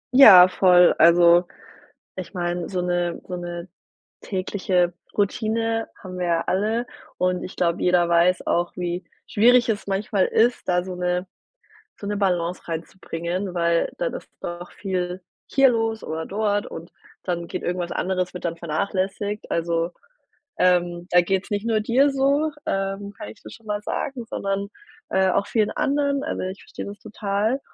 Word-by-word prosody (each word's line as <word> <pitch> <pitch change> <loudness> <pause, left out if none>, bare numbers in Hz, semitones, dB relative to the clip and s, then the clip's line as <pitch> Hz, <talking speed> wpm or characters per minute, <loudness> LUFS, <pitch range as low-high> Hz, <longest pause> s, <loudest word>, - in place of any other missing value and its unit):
Ja, 195 -9 +10
voll. 180 -1 +5
Also, 170 +1 +6 0.7
ich 185 0 -7
meine, 175 -1 -2
so 185 -2 -2
'ne 175 -1 -1
so 180 - -4
'ne 175 0 -6 0.5
tägliche 185 -2 0 0.2
Routine 225 +2 0
haben 185 -1 -8
wir 175 - -1
ja 165 -1 +2
alle 220 +5 0 0.3
und 180 0 0
ich - - -8
glaube, 170 -1 0
jeder 180 -1 +3
weiß 175 +2 +3
auch, 175 0 0
wie 175 0 -3 0.2
schwierig 245 +3 +4
es 205 -2 -2
manchmal 195 0 0
ist 235 +2 +2
da 180 0 +2
so 185 0 -6
'ne 180 +1 -1 0.7
so 200 - -7
'ne 205 0 -2
Balance 180 -3 -1
reinzubringen, 170 +2 -4
weil 170 -1 +1
dann - - -1
ist - - -9
doch 175 +1 -6
viel 185 -2 -3 0.3
hier 270 -1 +5
los 225 -2 -1
oder 160 +1 -4
dort 205 0 -1
und 165 +2 -9 0.3
dann 170 -2 -3
geht - - -5
irgendwas 175 -1 -2
anderes 185 -1 -1
wird 180 - -8
dann 170 0 -2
vernachlässigt. 195 +5 -2
Also, 170 0 0 0.7
ähm, 175 -1 +2
da 175 0 +6
geht's 190 +2 -1
nicht 205 +2 -2
nur 220 -2 +2
dir 255 +6 +3
so, 280 +3 +1
ähm, 195 +1 -2
kann 105 - -7
ich - - -15
dir 110 - -10
schon 225 - -14
mal 205 0 -2
sagen, 245 +2 -4
sondern, 200 0 -2 0.4
äh, 190 0 +3
auch 200 - +1
vielen 215 -1 +1
anderen. 280 0 0
Also, - - -3
ich 185 +1 -5
verstehe - - -8
das 205 +1 -8
total. 210 +3 -1
185 Hz, 160 wpm, -23 LUFS, 175-210 Hz, 0.7 s, Ja